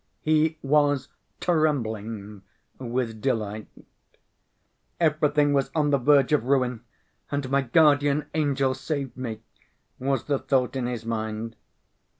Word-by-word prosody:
He 155 +1 +2
was 145 -1 +2 0.3
trembling 110 - -1 0.4
with 120 -3 -3
delight. 110 -4 -2 1.3
"Everything 150 -2 +2
was 140 -1 +1
on 150 -2 +2
the 140 - +3
verge 140 +1 +4
of 145 -6 +2
ruin 125 -3 +1 0.5
and 140 -2 -2
my 140 0 +3
guardian 145 +2 +3
angel 140 -4 +1
saved 140 -2 -4
me," 115 -4 -5 0.6
was 135 +1 0
the 140 -2 0
thought 130 -2 0
in 125 -2 -1
his 120 -2 -4
mind. 110 0 -3
135 Hz, 120 wpm, -25 LUFS, 115-145 Hz, 1.3 s, verge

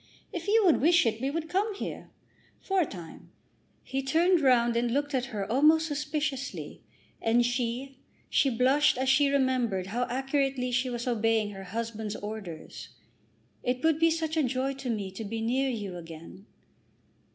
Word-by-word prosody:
If 345 0 -5
you 435 0 +4
would 335 -8 +4
wish 340 +2 +5
it, 225 0 0
we 265 - 0
would 320 +2 -3
come 400 +4 0
here, - - -6 0.5
for 385 -1 +1
a 315 - 0
time." 170 -4 -10 0.5
He 270 0 -3
turned 330 +6 +3
round 240 -3 +4
and 235 +1 +1
looked 285 +4 -1
at 255 -1 0
her 210 -6 -4
almost 310 +5 +5
suspiciously; 295 -2 -3 0.4
and 235 +1 +3
she, 245 +2 -2 0.3
she 275 - +3
blushed 260 +4 +3
as 260 +1 0
she 280 +1 +4
remembered 255 -8 +1
how 245 +1 +1
accurately 270 0 0
she 255 +1 +1
was 240 -1 -4
obeying 225 -2 +1
her 195 -1 -9
husband's 220 0 -4
orders. 205 -6 -7 0.7
"It 250 +1 -2
would 320 -1 +3
be 330 0 +5
such 320 -1 -1
a 315 - +3
joy 265 0 0
to 270 -1 -6
me 205 -4 -2
to 195 +4 -7
be 225 +2 -4
near 255 +4 +1
you 205 -7 -4
again." 165 +4 -11
255 Hz, 170 wpm, -28 LUFS, 225-290 Hz, 0.7 s, wish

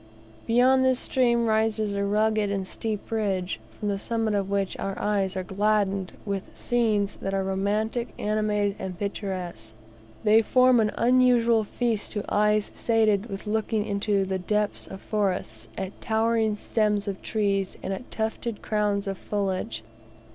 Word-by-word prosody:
Beyond 255 +3 +4
this 260 -1 +3
stream 235 -2 +2
rises 220 -1 +1
a 200 0 -1
rugged 215 +1 +2
and 195 -2 -2
steep 215 +1 -4
ridge, 195 -5 -1
from 210 - -6
the 200 -1 -1
summit 225 0 -1
of 200 -1 0
which 200 -1 0
our 195 0 -3
eyes 195 -2 0
are 185 - -2
gladdened 200 -1 0
with 200 -2 -3
scenes 215 -4 +1
that 195 0 -3
are 195 - 0
romantic, 210 +5 -1
animated 210 -1 0
and 185 -2 -5
picturesque. 185 - -5 0.5
They 215 +1 +6
form 255 +2 +4
an 215 -1 +3
unusual 240 -2 +4
feast 225 0 -2
to 210 -2 -3
eyes 210 0 +2
sated 220 -2 +2
with 195 -3 -7
looking 215 0 0
into 200 -1 0
the 190 0 -2
depths 210 +3 -1
of 190 - -9
forests, 180 - -2
at 190 0 -5
towering 220 -1 +1
stems 210 -1 0
of 195 -1 -4
trees, 200 -3 -1
and 195 - -2
at 195 - -7
tufted 220 0 -3
crowns 210 -1 0
of 195 -2 -4
foliage. 185 - -2
210 Hz, 155 wpm, -26 LUFS, 195-220 Hz, 0.5 s, They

